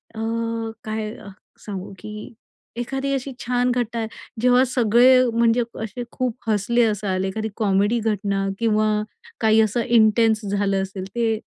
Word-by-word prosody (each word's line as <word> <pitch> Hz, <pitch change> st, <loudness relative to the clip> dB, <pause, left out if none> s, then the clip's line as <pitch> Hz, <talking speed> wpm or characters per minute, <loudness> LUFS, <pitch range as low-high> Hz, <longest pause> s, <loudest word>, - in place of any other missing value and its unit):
अ, -, -, -6 dB, 0.6 s
काय 215 Hz, 0 st, -3 dB, 0.5 s
सांगू 195 Hz, -3 st, -6 dB
की 215 Hz, +1 st, -8 dB, 0.5 s
एखादी 270 Hz, +3 st, -2 dB
अशी 270 Hz, 0 st, -3 dB
छान 245 Hz, 0 st, 0 dB
घटना, 235 Hz, -2 st, -1 dB, 0.4 s
जेव्हा 250 Hz, +1 st, +5 dB
सगळे 250 Hz, +1 st, +5 dB
म्हणजे 235 Hz, +1 st, +3 dB, 0.2 s
असे 230 Hz, +3 st, -5 dB
खूप 245 Hz, -2 st, -3 dB
हसले 225 Hz, +3 st, +2 dB
असाल, 200 Hz, -3 st, 0 dB
एखादी 215 Hz, +3 st, -3 dB
कॉमेडी 205 Hz, +2 st, +2 dB
घटना 200 Hz, -2 st, -1 dB
किंवा 215 Hz, -1 st, +2 dB, 0.5 s
काही 220 Hz, 0 st, +4 dB
असं 220 Hz, +2 st, +1 dB, 0.2 s
इंटेन्स 220 Hz, 0 st, +3 dB
झालं 200 Hz, -1 st, +1 dB
असेल, 190 Hz, 0 st, -5 dB
ते 225 Hz, -2 st, +1 dB
220 Hz, 130 wpm, -22 LUFS, 210-240 Hz, 0.6 s, जेव्हा